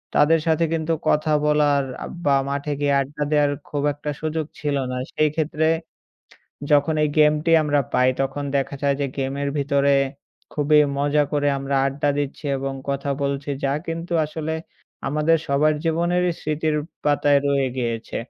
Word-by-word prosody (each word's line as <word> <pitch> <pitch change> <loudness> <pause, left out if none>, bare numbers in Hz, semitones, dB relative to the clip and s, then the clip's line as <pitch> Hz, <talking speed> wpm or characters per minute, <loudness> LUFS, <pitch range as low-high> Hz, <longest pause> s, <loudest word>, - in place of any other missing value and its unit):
তাদের 160 +2 +5
সাথে 160 +1 +3
কিন্তু 165 0 0
কথা 155 +1 +2
বলার 145 -2 +3 0.2
আ - - -4 0.2
বা 140 -1 +4
মাঠে 140 +1 -2
গিয়ে 145 -1 +1
আড্ডা 145 +2 -3
দেয়ার 145 -1 +3 0.2
খুব 145 -1 -2
একটা 145 +1 -6
সুযোগ 155 0 -2
ছিল 145 -1 -1 0.2
না। 125 - -3 0.2
সেই 155 0 +2
ক্ষেত্রে 160 0 0 1.0
যখন 145 +2 +4
এই - - +1
গেমটি 150 +2 +4
আমরা 145 -1 +2
পাই 125 0 +4
তখন 135 +1 -2
দেখা 135 +1 -1
যায় 140 -1 +2
যে 140 - +1
গেমের 140 +1 -2
ভিতরে 140 0 +2 0.6
খুবই 150 +1 +3 0.2
মজা 145 +1 +2
করে 145 -1 +1
আমরা 135 0 -3
আড্ডা 140 +2 -1
দিচ্ছি 145 +2 -4
এবং 135 0 -3 0.2
কথা 140 0 -2
বলছি 140 +1 -2
যা 135 - +1
কিন্তু 165 +1 -4
আসলে 155 +1 -4 0.6
আমাদের 150 +3 +2
সবার 150 +2 +2
জীবনেরই 175 +2 +1
স্মৃতির 155 0 -1 0.3
পাতায় 145 -1 +3
রয়ে 140 -2 +2
গিয়েছে। 115 -2 -3
145 Hz, 155 wpm, -22 LUFS, 140-155 Hz, 1.0 s, তাদের